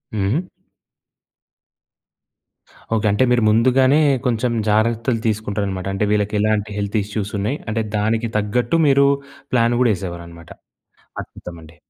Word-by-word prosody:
హుహు. 110 Hz, -, -1 dB, 2.5 s
ఓకే. 110 Hz, -1 st, -1 dB
అంటే 105 Hz, +5 st, +2 dB
మీరు 120 Hz, -2 st, +3 dB
ముందుగానే 130 Hz, +6 st, +4 dB, 0.3 s
కొంచెం 120 Hz, 0 st, 0 dB, 0.2 s
జాగ్రత్తలు 115 Hz, +2 st, +1 dB
తీసుకుంటారనమాట. 100 Hz, -3 st, -2 dB
అంటే, 100 Hz, +2 st, 0 dB
వీళ్ళకి 105 Hz, 0 st, 0 dB
ఎలాంటి 105 Hz, 0 st, 0 dB
హెల్త్ 100 Hz, +1 st, -2 dB
ఇష్యూస్ 105 Hz, 0 st, -4 dB
ఉన్నాయి, 110 Hz, +9 st, -1 dB
అంటే 110 Hz, +1 st, -1 dB
దానికి 110 Hz, +2 st, 0 dB
తగ్గట్టు 120 Hz, +9 st, 0 dB
మీరు 140 Hz, 0 st, +5 dB, 0.5 s
ప్లాన్ 120 Hz, -1 st, +3 dB
గూడా 120 Hz, -, +4 dB
ఏసేవారనమాట. 85 Hz, -2 st, -9 dB, 0.7 s
అద్భుతమండి. 85 Hz, -2 st, -12 dB
110 Hz, 110 wpm, -20 LUFS, 100-120 Hz, 2.5 s, మీరు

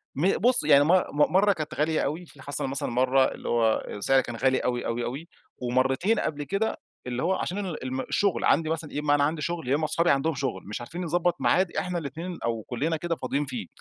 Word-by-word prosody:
م 180 Hz, +8 st, +2 dB
بُص 245 Hz, -4 st, +4 dB
يعني 145 Hz, -1 st, +6 dB
مر 180 Hz, +4 st, +4 dB
م 150 Hz, +3 st, +2 dB
مرة 200 Hz, +1 st, +5 dB
كانت 155 Hz, -3 st, -5 dB
غالية 155 Hz, +1 st, +1 dB
أوي، 160 Hz, +5 st, -3 dB
في 140 Hz, -4 st, -17 dB
حصل 140 Hz, 0 st, -3 dB
مثلًا 135 Hz, +1 st, -3 dB
مرة، 130 Hz, +2 st, +3 dB
اللي -, -, -5 dB
هو 115 Hz, -2 st, +2 dB
السعر 130 Hz, +6 st, +2 dB
كان 120 Hz, -1 st, -7 dB
غالي 130 Hz, +2 st, +2 dB
أوي، 120 Hz, -1 st, -2 dB
أوي، 120 Hz, +1 st, -2 dB
أوي، 145 Hz, +7 st, -5 dB, 0.3 s
ومرتين 130 Hz, -, +1 dB
قبل 145 Hz, -1 st, -2 dB
كده، 195 Hz, +10 st, -1 dB, 0.3 s
اللي 125 Hz, +2 st, -2 dB
هو 185 Hz, +3 st, +2 dB
عشان 185 Hz, -, -3 dB
ال 165 Hz, -7 st, -5 dB
الم 130 Hz, +1 st, -2 dB
الشغل 200 Hz, +5 st, 0 dB
عندي 160 Hz, -1 st, +3 dB
مثلًا 160 Hz, -1 st, -3 dB
إيه، 150 Hz, -, -3 dB
إما 145 Hz, -1 st, +2 dB
أنا 145 Hz, -, +2 dB
عندي 155 Hz, +1 st, 0 dB
شغل، 170 Hz, -6 st, -3 dB
يا 135 Hz, -, +3 dB
إمّا 155 Hz, +1 st, 0 dB
أصحابي 170 Hz, +3 st, +1 dB
عندهُم 145 Hz, +4 st, +1 dB
شغل، 125 Hz, -8 st, -3 dB
مش 105 Hz, +3 st, -5 dB
عارفين 170 Hz, +9 st, -6 dB
نضبط 175 Hz, +1 st, +1 dB
ميعاد 185 Hz, -1 st, +2 dB
إحنا 180 Hz, -1 st, -1 dB
الاتنين 165 Hz, +3 st, -5 dB
أو 115 Hz, -2 st, -2 dB
كُلّنا 155 Hz, +7 st, -1 dB
كده 170 Hz, +1 st, -2 dB
فاضيين 140 Hz, +2 st, -2 dB
فيه. 235 Hz, -, -5 dB
150 Hz, 230 wpm, -26 LUFS, 130-170 Hz, 0.3 s, يعني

